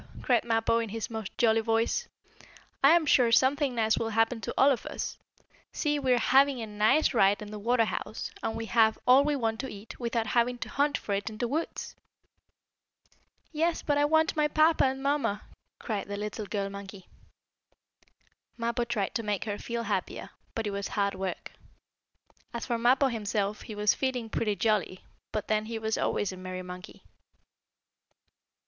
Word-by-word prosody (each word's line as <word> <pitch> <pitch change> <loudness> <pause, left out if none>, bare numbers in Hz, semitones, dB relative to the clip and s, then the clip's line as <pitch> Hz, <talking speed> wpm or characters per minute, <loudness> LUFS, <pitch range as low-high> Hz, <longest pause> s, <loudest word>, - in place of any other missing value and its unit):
cried 245 -3 +3
Mappo, 230 0 +1
in 230 -2 -3
his 225 +2 -5
most 220 -3 -5
jolly 225 -1 +3
voice. 225 +1 0 0.8
"I 290 +5 +8
am 340 -2 +2
sure 250 -5 +4
something 265 +2 +3
nice 220 -1 +2
will 225 - -1
happen 225 +1 +1
to - - -4
all 275 +2 +6
of 245 - -2
us. - - -5 0.5
See, 295 -1 0
we 265 -2 0
are - - +3
having 270 +2 +4
a 225 - -3
nice 215 +10 +2
ride 200 -3 +4
in 210 0 -8
the 210 - -6
water 230 +2 +2
house, 215 - -5
and 225 - -2
we 225 - -4
have 220 -1 +3
all 255 +2 +7
we 295 0 +1
want 225 -4 -1
to 265 - -4
eat, 205 +2 -10
without 235 -2 -1
having 245 +1 +1
to - - -6
hunt 285 +1 +1
for 205 - -4
it 200 +3 -2
in 215 - -9
the 240 - -1
woods." 310 +7 -4 1.6
"Yes, 330 +2 0
but 290 - +1
I 290 0 +3
want 315 +2 +2
my 300 -1 +3
papa 310 +1 +4
and 265 0 -1
mamma!" 280 -7 0 0.3
cried 215 -4 -4
the 200 0 -4
little 210 0 -5
girl 200 -1 -2
monkey. 200 -1 -9 1.5
Mappo 235 +1 -1
tried 215 -5 -2
to 230 - -1
make 210 -2 -2
her 205 -1 -3
feel 235 0 -4
happier, - - -3 0.2
but 225 - -2
it 205 - -2
was 200 0 -3
hard 200 -1 0
work. 190 -1 -5 1.0
As 235 - -4
for 235 -2 -1
Mappo, 260 +3 +4
himself, 210 -2 -2
he 215 - -8
was 210 0 +3
feeling 250 -4 -2
pretty 210 -2 0
jolly, 205 -4 0 0.3
but 215 -1 -3
then 215 0 +1
he 225 +1 -4
was 220 0 -1
always 205 - -1
a 185 - -9
merry 185 0 -6
monkey. 180 0 -10
225 Hz, 185 wpm, -28 LUFS, 210-260 Hz, 1.6 s, I